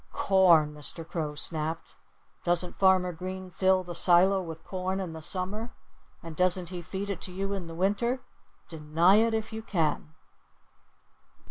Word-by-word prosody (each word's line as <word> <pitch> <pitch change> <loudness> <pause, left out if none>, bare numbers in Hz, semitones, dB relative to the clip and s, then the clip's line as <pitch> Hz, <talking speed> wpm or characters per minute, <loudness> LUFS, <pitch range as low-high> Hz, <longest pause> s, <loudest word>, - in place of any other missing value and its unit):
"Corn!" 170 -6 +4
Mr. 150 +2 -6
Crow 155 -4 -3
snapped. 160 +2 -3 0.5
"Doesn't 175 0 0
Farmer 185 -2 +4
Green 185 +2 -7
fill 190 +1 +2
the 175 -1 -7
silo 185 +3 +4
with 165 -2 -8
corn 185 0 -3
in 180 -4 -4
the 160 - -8
summer? 200 +7 -3 0.5
And 165 -1 -8
doesn't 180 0 +1
he 180 -1 -6
feed 195 +4 -5
it 185 - -5
to 185 - -5
you 195 +2 -3
in 190 -4 -4
the 165 - -8
winter? 210 +8 0 0.5
Deny 165 +4 +3
it 225 +1 +3
if 220 0 -4
you 220 - -4
can!" 160 -5 -2
180 Hz, 155 wpm, -28 LUFS, 165-195 Hz, 0.5 s, Corn